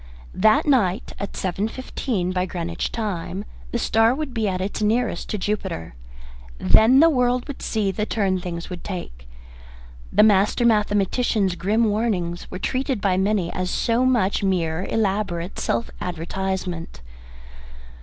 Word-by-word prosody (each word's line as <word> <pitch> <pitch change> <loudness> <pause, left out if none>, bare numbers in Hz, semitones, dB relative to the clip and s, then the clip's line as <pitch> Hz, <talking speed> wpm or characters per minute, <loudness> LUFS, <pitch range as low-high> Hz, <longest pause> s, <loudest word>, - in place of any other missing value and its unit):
That 275 +8 +4
night, 230 - +1
at 200 - -5
seven 190 +3 -1
fifteen 225 -6 -3
by 185 0 -1
Greenwich 170 -1 -3
time, 200 -3 -3 0.3
the - - 0
star 225 +1 +3
would 300 -3 -4
be 225 -3 0
at 185 -1 -2
its 195 +3 -3
nearest 215 -3 0
to 210 - -1
Jupiter. 190 - -3 0.6
Then 220 - +5
the 330 - +8
world 250 -2 +1
would 285 - -7
see 210 -3 0
the 210 +3 -2
turn 195 -4 0
things 170 -1 -5
would 180 -2 -8
take. - - -7 0.8
The - - +5
master 210 +3 +4
mathematician's 210 -1 +2
grim 205 +6 +1
warnings 205 -6 -1
were - - -6
treated 260 +4 -1
by 195 -2 +1
many 190 -2 0
as 185 0 -2
so 235 +5 +1
much 235 -7 +2
mere 180 -3 0
elaborate 195 -4 -1
self 115 - -1
advertisement. 180 - -4
200 Hz, 145 wpm, -23 LUFS, 180-225 Hz, 0.8 s, the